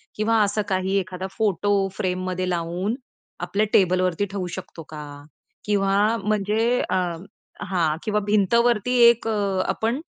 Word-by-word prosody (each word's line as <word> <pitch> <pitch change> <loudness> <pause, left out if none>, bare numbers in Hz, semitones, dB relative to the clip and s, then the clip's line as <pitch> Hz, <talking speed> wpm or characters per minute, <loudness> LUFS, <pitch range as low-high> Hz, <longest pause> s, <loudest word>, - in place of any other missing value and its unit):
किंवा 220 +1 +2
असं 205 +1 0
काही 190 +1 0
एखादा 185 0 -5
फोटो 205 -1 +1 0.2
फ्रेममध्ये 185 0 -2
लावून, 175 +5 -2 0.4
आपल्या 200 +5 0
टेबलवरती 185 0 +2
ठेवू 190 -3 -3
शकतो 165 - -9
का? 150 -1 -7 0.6
किंवा 195 -1 +1 0.3
म्हणजे 215 +3 +1
अ, - - +1 0.7
हां 165 -5 0
किंवा 210 -1 0
भिंतवरती 235 +3 +2
एक 235 -1 0
अ, 200 -3 0
आपण 235 +7 -1
200 Hz, 125 wpm, -23 LUFS, 185-215 Hz, 0.7 s, किंवा